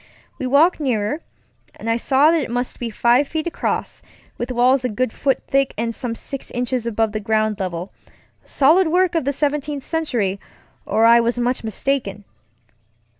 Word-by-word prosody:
We 260 - -2
walked 305 +8 +4
nearer, 255 +1 -1 0.5
and - - -9
I 230 0 +2
saw 275 +5 +4
that 330 -2 +2
it 265 - -4
must 245 +1 -3
be 240 - -3
five 240 +5 +2
feet 310 +1 -3
across, 345 - -3 0.3
with 245 +1 -4
walls 250 +2 +3
a 250 - 0
good 220 +2 -2
foot 275 -2 0
thick 275 0 +1
and 230 +1 -2
some 230 0 -3
six 275 +3 -7
inches 245 -1 -2
above 225 -1 0
the 215 - -3
ground 215 0 0
levelŌĆösolid 200 - -1
work 360 +2 +2
of 330 -5 0
the 280 - +1
Seventeenth 290 0 -2
Century, 235 - -1 0.5
or 225 - +3
I 235 +1 +7
was 235 +1 0
much 245 +1 0
mistaken. 220 -2 -2
250 Hz, 170 wpm, -20 LUFS, 225-285 Hz, 0.5 s, I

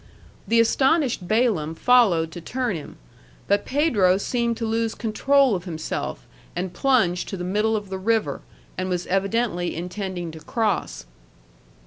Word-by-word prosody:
The 230 - +3
astonished 265 - +2
Balaam 205 -8 +1
followed 190 -9 +4
to 175 - -8
turn 245 +3 -2
him; 155 - -8 0.5
but 200 +1 +1
Pedro 225 - +3
seemed 235 +2 -1
to 230 - -3
lose 225 0 -1
control 265 +3 +2
of 180 -2 -3
himself, 160 - -4 0.3
and 180 +1 -3
plunged 220 -10 +1
to 195 - -4
the 180 - -5
middle 210 +4 +1
of 205 -2 -4
the 190 - -3
river, 220 +2 0 0.4
and 185 0 -2
was 180 -1 -2
evidently 195 -1 0
intending 180 0 -4
to 160 - -10
cross. 210 +5 -2
205 Hz, 145 wpm, -23 LUFS, 180-235 Hz, 0.5 s, followed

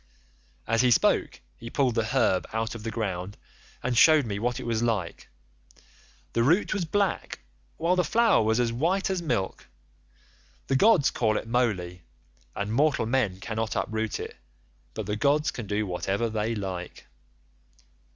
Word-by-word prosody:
"As 115 +1 +2
he 125 - +4
spoke 120 - +2 0.2
he 115 - -8
pulled 130 -2 +1
the 115 -1 0
herb 105 -6 +1
out 110 0 -2
of 115 - -8
the 115 - -4
ground 100 -4 -4 0.5
and 125 -1 -1
shewed 155 +2 +6
me 100 -3 -3
what 120 +2 -1
it - - -7
was 115 -1 -1
like. 110 -8 -2 1.0
The 115 - +1
root 165 - +3
was 200 -5 -1
black, 200 - -1 0.4
while 170 +3 +1
the 180 - +2
flower 230 - +3
was 110 +2 +1
as 120 -1 +1
white 180 +10 0
as 185 -2 -1
milk; 100 - -2 1.0
the 135 - 0
gods 190 -1 +4
call 110 -3 +1
it - - -5
Moly, 100 -8 -1 0.5
and 100 +2 -3
mortal 145 -1 +2
men 110 -6 0
cannot 110 +1 -3
uproot 110 -1 -2
it, - - -7 0.6
but 110 - -4
the 105 +1 -2
gods 145 +6 +2
can 115 -4 -7
do 105 +1 -1
whatever 100 +4 -2
they 110 +1 -1
like. 95 -4 -6
115 Hz, 160 wpm, -26 LUFS, 105-135 Hz, 1.0 s, shewed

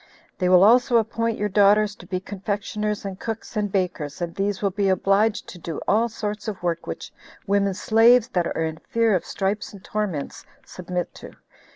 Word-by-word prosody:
They 180 -1 +2
will 180 0 +7
also 240 +3 +5
appoint 230 0 0
your 210 - 0
daughters 205 +1 +4
to - - -13
be 185 - -2
confectioners, 205 +2 -3
and 195 -1 -6
cooks, 225 +1 -6
and 205 -2 -1
bakers; 180 -5 -2
and 170 -1 -3
these 200 0 -1
will 200 - +2
be 200 +1 0
obliged 195 +3 +2
to 180 - -10
do 165 -2 -5
all 225 +4 +3
sorts 210 -1 -5
of 200 -4 -5
work 170 -1 -2
which 80 - -6 0.3
women 200 -1 +1
slaves, 230 +4 +5
that 180 -7 0
are 165 - -2
in 160 0 -4
fear 230 +3 +1
of 185 - 0
stripes 200 +2 -2
and 195 -2 -12
torments, 195 -9 -3 0.2
submit 180 -1 -5
to. - - -11
200 Hz, 190 wpm, -23 LUFS, 185-215 Hz, 0.3 s, will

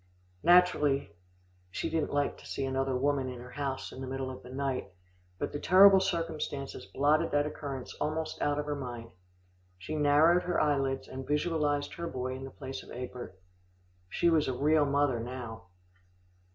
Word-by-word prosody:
Naturally 150 - +4 0.5
she - - -3
didn't 160 -2 -1
like 145 0 0
to - - -15
see 135 - -3
another 135 0 -1
woman 135 0 +1
in 125 -1 -7
her 125 +1 -10
house 140 -2 -4
in 130 - -9
the 130 - -5
middle 130 0 -3
of 130 - -9
the - - -12
night, 130 -5 -3 0.5
but - - -3
the 145 - -4
terrible 190 +3 +7
circumstances 165 -6 -3
blotted 145 +2 +2
that 145 0 +2
occurrence 140 -3 -5
almost 155 +1 -2
out 145 0 +1
of 150 - -2
her 150 - -2
mind. 120 -4 -7 0.7
She 95 +12 -6
narrowed 155 +4 +5
her 180 -1 -1
eyelids, 135 -3 0
and 130 0 -7
visualised 150 -1 0
her 170 0 -5
boy 130 -3 -3
in 135 +1 -7
the - - -7
place 135 -1 -7
of - - -15
Egbert. 120 -6 -7 0.7
She 170 - +1
was 160 -3 +3
a 130 -2 -2
real 150 +2 +3
mother 140 -3 +2
now. 120 -2 -6
140 Hz, 175 wpm, -30 LUFS, 130-150 Hz, 0.7 s, terrible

